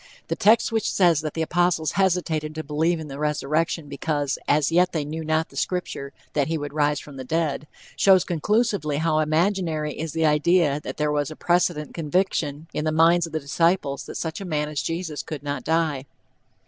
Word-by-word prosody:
The - - 0
text 220 +3 +4
which 225 -2 0
says 170 -5 +3
that 155 -1 -5
the 160 - 0
apostles 175 -1 +1
hesitated 170 -5 0
to 160 - -4
believe 160 +3 0
in 155 - -7
the 140 0 -8
resurrection 150 +1 -1
because 145 0 -2
"as 150 +1 +2
yet 180 +2 +3
they 155 -3 -1
knew 160 +2 -5
not 160 +1 0
the - - -17
scripture, 180 -6 -3 0.2
that 145 -2 +1
he 160 0 -1
would 145 -1 -6
rise 150 -1 +1
from 145 -2 -11
the 130 - -5
dead," 155 +1 -1 0.3
shows 190 -2 +5
conclusively 190 -3 0
how 155 0 +1
imaginary 155 -1 0
is 160 -1 -5
the 160 0 +1
idea 150 0 +3
that - - -7
there 150 0 +1
was 145 -1 0
a 155 - -8
"precedent 175 -3 0
conviction" 160 -2 -1
in - - -2
the 155 - 0
minds 165 +2 +4
of - - -12
the 160 - -1
disciples 150 -1 0
that - - -8
such 165 +3 -4
a - - -4
man 150 -3 -1
as 150 -2 -2
Jesus 165 -2 -3
could 150 -3 -7
not 145 0 -3
die. 160 -4 0
155 Hz, 200 wpm, -24 LUFS, 150-170 Hz, 0.3 s, shows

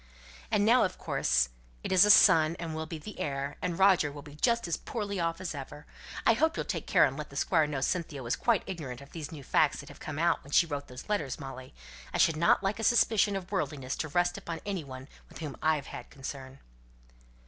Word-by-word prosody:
"And 210 -2 +2
now 240 +3 +5
of 185 - -2
course 65 -1 +1 0.3
it - - -4
is 185 +1 +7
a - - +2
son, 165 -6 +7
and 165 -2 -5
will 160 0 -4
be 165 - -6
the 205 +7 -10
heir, 140 0 -3
and 175 -2 -2
Roger 190 -6 +4
will 145 0 -10
just 235 - 0
be - - -5
as 165 - +1
poorly 205 -4 -4
off 165 0 -1
as 185 -3 -4
ever. 145 +1 -8 0.4
I 230 - +6
hope 315 +8 +1
you'll - - -2
take - - -4
care - - +5
and - - -2
let - - -6
the - - -13
Squire 160 -4 +2
know 145 -3 -3
Cynthia 155 -3 -2
was 120 - -1
quite 235 -5 +1
ignorant 140 -9 -6
of 140 - -14
these 155 -3 -7
new 150 -4 -9
facts - - +2
that - - -10
have - - -13
come 150 -2 -6
out 170 +1 +1
when 140 - -12
she 170 - +6
wrote 145 -3 -5
those 125 0 -10
letters, 155 - -2
Molly? 130 - -9 0.4
I - - +2
should 165 - +4
not 170 +4 +3
like 195 +3 -1
a - - -3
suspicion 215 -3 +3
of 190 -1 -6
worldliness 145 -8 -2
to 160 - -2
rest 175 +3 0
upon 170 -1 -6
any 195 -5 -3
one 130 -1 -9 0.2
with - - -12
whom 150 -4 -6
I 160 0 +3
had 140 -3 -5
any - - -6
concern." 135 -1 -8
160 Hz, 240 wpm, -29 LUFS, 140-190 Hz, 0.4 s, is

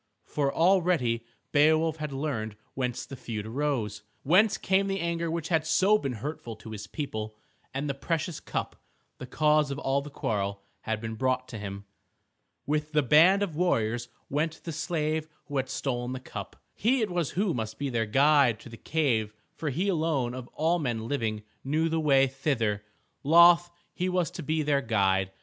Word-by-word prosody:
For 140 -2 0
already 165 -11 +2 0.2
Beowulf 155 +2 +4
had 150 -2 -4
learned 135 -7 -3 0.2
whence 125 -2 -2
the 135 - -8
feud 110 -4 -5
arose, 115 -4 -2 0.2
whence 195 +9 +4
came 195 +1 +2
the 195 0 -1
anger 170 -1 -1
which 160 -1 -3
had 165 -3 +3
been - - -17
so 195 +6 +4
hurtful 125 -2 -4
to 110 +1 -11
his 105 -1 -7
people. 110 -5 -5 0.4
And 140 +3 -3
the 140 - -1
precious 160 +3 -2
cup, - - -4 0.4
the 130 - -7
cause 150 +2 +3
of 140 - -3
all 140 0 0
the 145 - -8
quarrel, 100 -7 -2 0.2
had 110 -1 -3
been 110 -1 -4
brought 130 +2 0
to 115 - -6
him. 100 0 -6 0.8
With 150 +2 -1
the 150 -1 +3
band 170 - +6
of 175 -7 -3
warriors 120 -9 +1 0.2
went 155 +3 -2
the 165 - -4
slave 155 -1 -1 0.2
who 145 - -4
had 130 -1 -1
stolen 125 -2 -2
the 130 - -4
cup. 130 - -8 0.2
He 245 +4 +2
it 205 - -2
was 175 -5 -1
who 195 -3 +2
must 110 -3 -4
be 140 -1 -2
their 115 -2 0
guide 135 -1 +4
to - - -11
the 115 - -10
cave, 115 -10 0 0.2
for 155 - -3
he 175 +9 -1
alone 155 -9 0
of 130 -1 -7
all 165 +3 +2
men 115 -6 -2
living 110 -6 -2 0.2
knew 155 +4 +1
the 165 0 0
way 135 -3 +5
thither. 130 -6 -1 0.4
Loth 170 +3 +7 0.2
he 180 +1 -1
was 180 -4 0
to - - -6
be 155 +1 0
their 145 -1 +2
guide. 95 -5 +2
140 Hz, 185 wpm, -28 LUFS, 115-160 Hz, 0.8 s, Loth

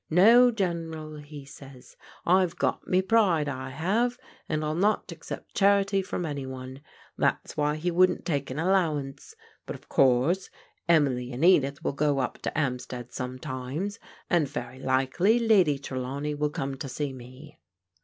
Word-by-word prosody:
* - - -52
No, 230 +9 +7
General,' 165 -7 -3
he 145 -1 -10
says, 135 -2 -14 0.2
* - - -24
I've 180 -1 +3
got - - -1
me 185 +1 +2
pride, 190 -8 +3
I 130 -1 -4
have, 205 - 0 0.3
and 155 -1 -1
I'll 155 - -1
not 205 +6 +1
accept - - -8
charity 195 -1 +3
from 180 -2 -4
any 140 -3 -4
one.' 130 +1 -8 0.4
That's - - 0
why 150 0 +1
he 170 +3 -2
wouldn't 185 +2 +3
take 140 -5 -1
an 130 - -5
allowance. 160 -6 -1 0.3
But, - - -5
of - - -16
course, 135 +9 +3 0.4
Emily 135 -6 +2
and 130 +6 0
Edith 140 -6 +3
will - - -1
go 145 0 +1
up 130 - -2
to - - -4
'Ampstead 125 -4 -3
some 125 0 -5
times, 130 - -5 0.3
and 170 -5 +2
very 130 -2 -6
likely 135 - +2
Lady 200 -11 +4
Trelawney 135 +2 -4
will 150 0 -1
come 135 -2 -4
to 135 - -6
see 140 +1 -3
me. 130 +4 -13
150 Hz, 165 wpm, -27 LUFS, 135-180 Hz, 0.4 s, No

